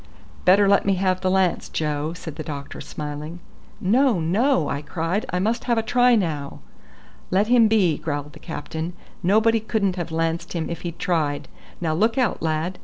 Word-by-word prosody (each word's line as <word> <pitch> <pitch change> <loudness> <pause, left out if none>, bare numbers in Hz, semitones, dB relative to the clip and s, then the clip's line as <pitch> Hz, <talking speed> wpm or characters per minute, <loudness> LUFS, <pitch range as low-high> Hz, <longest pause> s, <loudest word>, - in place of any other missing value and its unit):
"Better 195 +2 +6
let 200 0 +4
me 195 -1 +2
have 185 0 0
the 185 - +1
lance, 185 -2 +1
Joe," 150 0 -2
said 165 -3 -8
the 155 - -6
doctor 140 -2 -7
smiling. 150 +3 -6 0.4
"No, 230 +1 +3
no," 180 - +2
I 140 - -2
cried. 165 +6 -2
"I 180 - -1
must 220 +6 0
have 235 -2 +1
a 225 - +1
try 245 +1 +4
now." 155 -9 -2 0.7
"Let 200 +4 +2
him 240 -2 +6
be," 190 -8 +2
growled 145 -1 -4
the - - -13
captain; 160 +1 -5 0.3
"nobody 220 +5 +3
couldn't 210 -4 -1
have 170 -2 -4
lanced 165 +1 -1
him 170 -2 -3
if 170 0 -5
he'd 170 -1 -5
tried. 155 -5 -1 0.3
Now 160 -3 0
look 220 +8 +1
out, 250 -6 +1
lad! 160 +3 -1
180 Hz, 180 wpm, -23 LUFS, 160-210 Hz, 0.7 s, Better